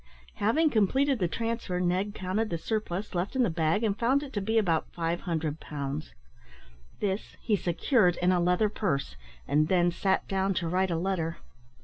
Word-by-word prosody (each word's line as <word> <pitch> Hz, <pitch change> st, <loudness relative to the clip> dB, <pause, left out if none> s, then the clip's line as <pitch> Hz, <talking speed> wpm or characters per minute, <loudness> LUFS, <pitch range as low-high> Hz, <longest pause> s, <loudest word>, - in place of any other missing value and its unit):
Having 295 Hz, +10 st, +2 dB
completed 260 Hz, +5 st, +2 dB
the 180 Hz, -, +2 dB
transfer, 230 Hz, -2 st, -2 dB
Ned 185 Hz, +4 st, 0 dB
counted 200 Hz, +4 st, -1 dB
the 170 Hz, -, -1 dB
surplus 210 Hz, 0 st, -3 dB
left 180 Hz, +7 st, -2 dB
in 260 Hz, -, +3 dB
the 215 Hz, -, +1 dB
bag, 160 Hz, +5 st, +1 dB
and 210 Hz, -3 st, +1 dB
found 265 Hz, +5 st, +2 dB
it 280 Hz, -, -9 dB
to 205 Hz, -, -1 dB
be 220 Hz, +3 st, 0 dB
about 170 Hz, -7 st, +1 dB
500 165 Hz, -2 st, -2 dB
pounds. 145 Hz, -, -5 dB, 0.8 s
This 200 Hz, 0 st, -3 dB
he 215 Hz, -, +1 dB
secured 180 Hz, -, +2 dB
in 180 Hz, +1 st, +2 dB
a 180 Hz, -, +3 dB
leather 180 Hz, +4 st, +3 dB
purse, 140 Hz, -, -2 dB, 0.3 s
and 155 Hz, +1 st, +3 dB
then 175 Hz, 0 st, +3 dB
sat 190 Hz, +2 st, 0 dB
down 195 Hz, 0 st, 0 dB
to 170 Hz, -2 st, -1 dB
write 185 Hz, +3 st, +1 dB
a 170 Hz, -, 0 dB
letter. 170 Hz, -2 st, -1 dB
185 Hz, 175 wpm, -28 LUFS, 170-215 Hz, 0.8 s, in